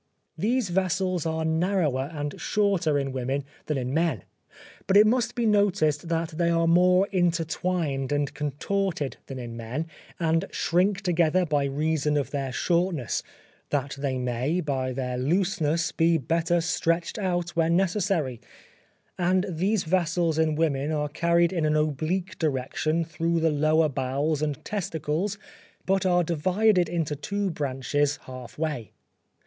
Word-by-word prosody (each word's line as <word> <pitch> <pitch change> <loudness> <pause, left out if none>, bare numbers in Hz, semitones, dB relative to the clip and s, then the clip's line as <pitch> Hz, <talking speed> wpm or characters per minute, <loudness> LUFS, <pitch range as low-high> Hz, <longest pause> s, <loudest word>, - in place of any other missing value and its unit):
These 235 -1 0
vessels 185 -1 0
are 160 0 -1
narrower 160 -5 +1
and 145 -2 -5
shorter 195 -8 +1
in 135 -1 -1
women 130 +2 -2 0.2
than 150 - 0
in 130 0 -3
men; 160 - 0 0.6
but 195 - +5
it 210 - +8
must 235 +1 +1
be 240 - 0
noticed 175 -7 +2
that 165 -1 0
they 170 -1 +3
are 165 0 +2
more 180 +3 +5
intertwined 165 -5 0
and 145 0 0
contorted 150 +2 -2
than 135 - -6
in 120 -2 -6
men, 120 +7 -4 0.3
and 165 +1 +1
shrink 185 +4 +1
together 175 0 +2
by 145 -3 +1
reason 150 +1 0
of 140 - -2
their 135 -2 -2
shortness 170 -4 0 0.5
that 140 -1 -1
they 135 -2 -1
may, 125 +7 -1
by 135 -5 -1
their 125 -1 -3
looseness, 170 +2 +1
be 165 0 +3
better 165 +4 +1
stretched 165 +4 0
out 175 -3 -1
when 165 0 +2
necessary: 180 - 0 0.8
and 185 +2 +2
these 190 +4 0
vessels 170 -1 +1
in 155 -1 +2
women 150 -2 0
are 150 -1 -1
carried 170 +3 +2
in 170 -3 0
an 155 0 +2
oblique 155 +5 -1
direction 155 +2 0
through 165 +1 -1
the 160 0 +2
lesser 155 +2 +3
bowels 140 +3 -1
and 150 -3 -3
testicles 180 0 -2 0.5
but 190 0 +2
are 175 -1 +3
divided 180 +3 +2
into 160 -4 -1
two 200 +6 -2
branches 145 0 -1
half 130 -2 -9
way. 150 -8 -3
160 Hz, 145 wpm, -26 LUFS, 145-180 Hz, 0.8 s, it